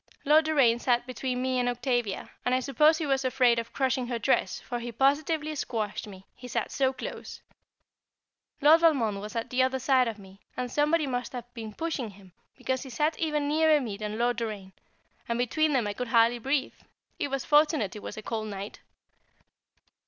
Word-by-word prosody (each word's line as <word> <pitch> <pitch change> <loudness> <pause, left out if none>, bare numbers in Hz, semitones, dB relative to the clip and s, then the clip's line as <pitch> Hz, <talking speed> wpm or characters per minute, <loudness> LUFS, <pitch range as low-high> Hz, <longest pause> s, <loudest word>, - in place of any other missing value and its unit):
Lord 305 +2 +5
Doraine 270 -7 +3
sat 240 -1 +1
between 255 0 -3
me 260 -1 0
and 245 0 +1
Octavia, 245 -4 -2
and 250 - +2
I - - +2
suppose 300 +5 +3
he 320 - -2
was 270 -1 +1
afraid 250 -2 +3
of 230 - -6
crushing 260 -2 0
her 240 -1 -2
dress, 200 -3 +1
for 240 -1 -5
he 240 0 -5
positively 305 - +1
squashed 220 -7 -3
me, 190 -2 -12
he 250 - -11
sat - - -2
so 265 -1 +1
close. 265 - -7 1.2
Lord 310 +3 +7
Valmond 235 -12 +2
was 210 +3 -8
at 230 - -3
the 255 +1 +2
other 260 0 +2
side 260 -1 +3
of 225 -2 -4
me, 195 -1 -15 0.2
and 250 -1 -3
somebody 300 +2 +2
must 250 -2 -3
have 245 -1 -8
been 220 -3 -8
pushing 315 -8 -3
him, 195 -2 -16 0.3
because 260 0 -2
he 270 - -8
sat 300 +6 -1
even 300 -3 0
nearer 310 0 +4
me 230 -7 -4
than 210 +1 -5
Lord 240 0 +1
Doraine, 210 -5 -5 0.6
and 235 - 0
between 305 +6 +1
them 250 -5 +2
I 205 - -2
could 250 +3 -4
hardly 230 +1 +4
breathe; 270 +3 -1 0.5
it - - 0
was 275 -2 -3
fortunate 295 - +3
it 210 - -8
was - - -7
a 215 - -7
cold 220 -1 -3
night. 200 0 -7
250 Hz, 195 wpm, -28 LUFS, 230-280 Hz, 1.2 s, Lord